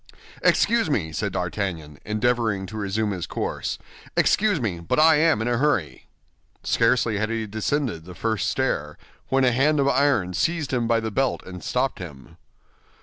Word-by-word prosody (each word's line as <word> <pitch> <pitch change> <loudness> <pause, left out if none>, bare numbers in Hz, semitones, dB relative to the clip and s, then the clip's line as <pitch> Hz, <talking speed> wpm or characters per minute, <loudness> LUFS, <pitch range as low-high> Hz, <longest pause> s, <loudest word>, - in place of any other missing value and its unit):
"Excuse 230 -7 +3
me," 85 - 0
said 100 +5 -2
D'Artagnan, 85 -5 -3
endeavoring 110 -2 0
to 110 - -9
resume 105 +1 -1
his 90 -4 -4
course, - - -3 0.4
"excuse 205 -5 +3
me, 100 -9 -2
but 85 - -1
I 160 0 +6
am 155 -8 +3
in - - -2
a 120 -1 +1
hurry." 130 - 0 0.6
Scarcely 115 -5 +2
had 110 +1 -1
he 115 -1 -2
descended 110 - -2
the 90 0 -10
first 110 0 -1
stair, 75 - -1 0.3
when 135 0 +2
a 125 - +4
hand 145 +5 +2
of 140 - +2
iron 135 -10 +2
seized 160 - -1
him 120 -2 +1
by 115 -1 +2
the 110 0 -3
belt 135 +4 0
and 90 -1 -9
stopped 130 +1 -1
him. 75 -8 -10
110 Hz, 170 wpm, -24 LUFS, 95-135 Hz, 0.6 s, I